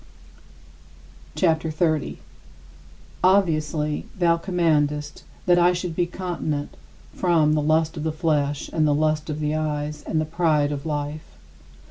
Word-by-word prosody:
CHAPTER 160 -2 +2
XXX - - -5
41. 155 -2 0 1.1
Obviously 155 -5 +2
thou 170 -2 +3
commandest 155 -5 0 0.2
that 175 -1 +5
I 175 +1 +5
should 175 -2 -4
be 175 0 +1
continent 170 -5 -4 0.4
from 165 -4 +2
"the 155 - +2
lust 160 +1 +1
of 150 - -4
the 160 - 0
flesh, 150 -3 0
and 155 -2 +2
the 145 - +3
lust 155 +1 0
of 150 0 -3
the 150 0 -1
eyes, 150 -1 -2
and 160 - 0
the 155 - 0
pride 155 -3 +1
of 145 +1 -4
life." 145 - -4
155 Hz, 140 wpm, -23 LUFS, 150-170 Hz, 1.1 s, that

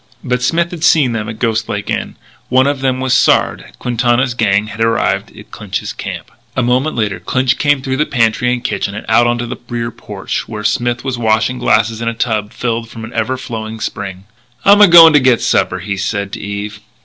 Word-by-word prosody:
But 125 0 -1
Smith 170 +7 0
had 170 -3 -7
seen 150 -7 +4
them 110 -2 -3
at 110 - -7
Ghost 115 -1 -1
Lake 105 0 -3
Inn. - - -3 0.3
One 130 +1 +4
of 140 -1 -1
them 130 -1 0
was 130 -1 0
Sard. - - +2
Quintana's 120 +1 0
gang 105 -3 +1
had 105 +1 -8
arrived 115 0 0
at - - -14
Clinch's - - -5
dump. - - -7 0.2
A 130 - +1
moment 130 +5 +1
later 105 -5 -1
Clinch 130 +8 0
came 145 -2 +2
through 130 -1 -2
the 150 - +1
pantry 120 0 +1
and 125 -1 -2
kitchen 100 -4 -2
and 105 - -7
out 120 +2 +4
onto 120 0 -1
the 120 - -6
rear 120 -1 -3
porch - - -5
where 105 -1 -6
Smith 120 +2 0
was 130 -3 -3
washing 115 +3 +1
glasses 110 -1 +1
in 115 - -3
a 115 - -1
tub 110 -3 -1
filled 115 -1 -3
from 115 -1 -9
an 115 - -11
ever 115 +3 -1
flowing 110 -3 -6
spring. 95 -3 -5 0.4
"I'm 205 +1 +7
a 205 - +9
going 165 -2 +9
to 150 - +6
get 130 -3 +3
supper," - - +1
he 100 +2 -4
said 100 +1 -3
to - - -6
Eve. 100 0 -5
120 Hz, 215 wpm, -15 LUFS, 110-130 Hz, 0.4 s, a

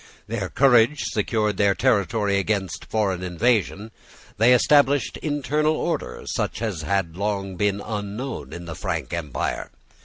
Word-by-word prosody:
Their 100 -4 -3
courage 130 +1 +4
secured 105 -1 0
their 100 -1 +3
territory 105 -4 +1
against 100 -4 -2
foreign 100 -5 -1
invasion. 105 +3 0 0.5
They 115 +3 +6
established 145 +2 +3
internal 150 +1 0
order, - - -3
such - - -2
as 105 -8 -3
had 90 -1 -1
long 100 -1 -2
been 100 +2 0
unknown 105 +5 -5
in 85 0 -8
the 85 - -6
Frank 80 - -4
empire. 80 -6 -3
105 Hz, 130 wpm, -23 LUFS, 95-120 Hz, 0.5 s, They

